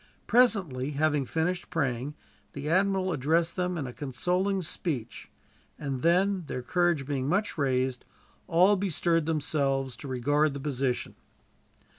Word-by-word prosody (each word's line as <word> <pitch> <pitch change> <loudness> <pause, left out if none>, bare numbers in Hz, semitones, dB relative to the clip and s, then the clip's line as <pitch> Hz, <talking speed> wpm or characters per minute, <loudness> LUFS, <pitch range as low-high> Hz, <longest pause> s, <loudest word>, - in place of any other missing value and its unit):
Presently, 185 - +2
having 145 -2 +1
finished 175 +3 -1
praying, 140 -4 -1 0.4
the 140 +1 -5
admiral 190 +2 +2
addressed 165 +5 +1
them 180 -1 -1
in 145 - -3
a 125 - -6
consoling 180 +9 -1
speech; 140 -8 -4 0.5
and 135 -3 -4
then, 185 +3 +2
their 125 - -4
courage 175 0 +1
being 135 -2 -2
much 200 +5 0
raised, 130 -3 0 0.4
all 180 +4 +5
bestirred 170 -4 +1
themselves 140 -4 0
to 140 - -8
regard 145 +3 +1
the - - -4
position. 135 -3 -2
150 Hz, 130 wpm, -28 LUFS, 135-180 Hz, 0.5 s, all